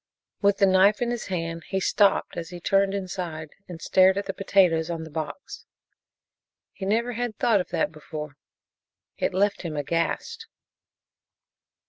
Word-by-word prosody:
With 200 -1 +3
the 200 - +5
knife 195 +2 +4
in 240 -1 0
his 240 -2 -4
hand 165 -3 -3
he 190 - -1
stopped 200 +1 +2
as 165 -1 -5
he 175 -1 -8
turned 195 +2 +2
inside 180 -5 -5 0.2
and 175 -2 -8
stared 190 +2 +4
at 200 - -2
the - - -3
potatoes 180 -5 +2
on 165 -1 -3
the 160 - -10
box. 160 - -6 1.1
He 190 - -6
never 230 +4 +1
had 235 -2 -3
thought 215 -5 +3
of - - -8
that 150 - 0
before 150 -1 -8 0.8
it - - 0
left 200 +2 +1
him 160 -4 -5
aghast. 170 - -2
185 Hz, 155 wpm, -25 LUFS, 165-200 Hz, 1.1 s, the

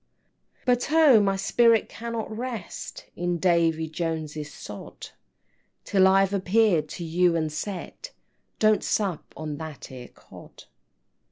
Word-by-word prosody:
IX. - - -44
"But 245 +2 +1
oh, 310 -7 +7
my 195 -1 +1
spirit 230 +3 +3
cannot 230 -1 -5
rest 235 -5 -6
In 175 0 -1
Davy 165 -2 +2
Joneses 155 -2 -4
sod, 105 -6 -10 0.7
Till 190 -2 +4
I've 195 +1 +3
appeared 190 -5 +2
to 175 - -6
you 170 +1 +2
and 155 -2 -1
said 200 - -6 0.5
Don't 215 -1 +3
sup 195 -7 -2
on 155 -2 -5
that 155 -3 -8
'ere 125 -2 -9
Cod!" - - -15
180 Hz, 125 wpm, -25 LUFS, 160-220 Hz, 0.7 s, oh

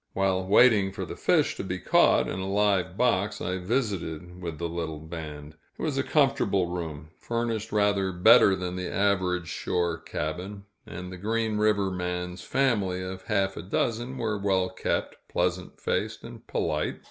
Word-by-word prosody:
While 95 -1 +1
waiting 105 -2 +5
for 95 -1 -5
the - - -7
fish - - +2
to - - -3
be - - -3
caught - - +4
in 95 - -3
a 95 +1 -3
live 100 -2 +1
box, 105 -4 +1
I 90 +1 -2
visited 90 - -3
with 85 -3 -5
the 85 - -2
little 80 -2 -4
band. 80 -1 -8 0.2
It - - -9
was - - 0
a - - +2
comfortable 95 -2 +2
room, 80 -4 -5
furnished 115 -2 -2
rather 100 -2 +2
better 95 +2 +6
than 90 -1 -4
the 90 -1 -4
average 90 -3 +1
shore 85 0 -1
cabin, 90 +8 -5 0.2
and 90 +1 -7
the 90 - -7
Green 110 +2 -1
River 105 -2 +2
man's 90 0 -3
family 100 -9 0
of 95 0 -7
half 95 -3 0
a - - -5
dozen 120 +7 -2
were 110 -4 -1
well 95 -2 +1
kept, 95 - -2
pleasant 90 +1 -1
faced, - - -2
and - - -11
polite. - - -1
95 Hz, 170 wpm, -27 LUFS, 90-105 Hz, 0.2 s, better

